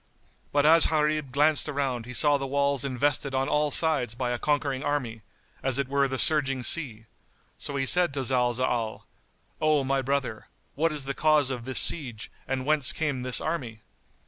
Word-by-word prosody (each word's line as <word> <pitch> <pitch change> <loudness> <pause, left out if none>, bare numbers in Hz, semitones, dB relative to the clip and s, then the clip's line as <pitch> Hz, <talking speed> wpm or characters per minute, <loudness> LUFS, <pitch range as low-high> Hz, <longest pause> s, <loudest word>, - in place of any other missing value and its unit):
But 145 0 +1
as 165 +1 +6
Gharib 150 -3 -1
glanced 150 +3 +1
around 135 -5 -3
he 125 - -8
saw 145 -2 +5
the 135 - -4
walls 140 -1 0
invested 140 +1 -1
on 135 0 0
all 150 0 +1
sides 145 -7 +1
by 125 0 -3
a 120 - -3
conquering 145 -3 -1
army,[FN#75] 130 -7 -3 0.4
as 135 -1 0
it 140 -1 -1
were 140 0 +1
the 130 0 -4
surging 135 -3 +2
sea, 120 -8 -1 0.5
so 140 - -6
he 135 -1 -1
said 180 +3 +4
to 135 - -2
Zalzal, 120 -2 -1 0.6
"O 155 -2 +2
my 135 0 0
brother, 130 -5 -3 0.3
what 165 +3 0
is 150 -3 -4
the 140 - -3
cause 150 -2 +2
of 120 -2 -6
this 130 -1 +1
siege 120 -9 0 0.2
and 130 -1 -3
whence 150 -3 +3
came 145 -5 -3
this 125 0 +2
army?" 125 -9 -5
135 Hz, 180 wpm, -26 LUFS, 125-150 Hz, 0.6 s, as